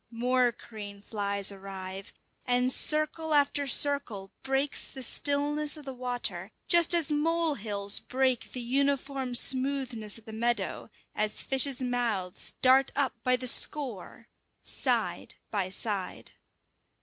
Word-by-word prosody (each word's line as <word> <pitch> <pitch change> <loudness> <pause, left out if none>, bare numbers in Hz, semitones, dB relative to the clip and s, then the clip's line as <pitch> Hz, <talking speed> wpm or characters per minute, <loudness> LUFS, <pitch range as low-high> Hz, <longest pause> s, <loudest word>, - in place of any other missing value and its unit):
More 245 +1 +1
crane 205 -3 -11
flies 200 -2 -1
arrive, 195 -1 -8 0.4
and 250 +1 +2
circle 310 +1 +2
after 285 0 +1
circle 250 -8 +2
breaks 270 +1 -1
the 265 - -7
stillness 290 +4 0
of 300 - -12
the 270 - -6
water, 245 -1 -3 0.2
just 345 0 +5
as 320 -3 +2
mole 325 +2 +1
hills 205 -4 +2
break 255 -2 -1
the 250 - -5
uniform 270 0 -1
smoothness 255 -4 +2
of 225 - -16
the 220 - -10
meadow, 235 +2 -2 0.2
as 215 0 -1
fishes' 270 -1 +3
mouths 230 -7 -2
dart 265 +1 +5
up 275 -2 0
by 255 0 +3
the 250 0 -5
score 245 -4 +1 0.4
side - - -2 0.2
by 195 -3 -2
side. 195 -1 -5
250 Hz, 125 wpm, -28 LUFS, 215-280 Hz, 0.4 s, just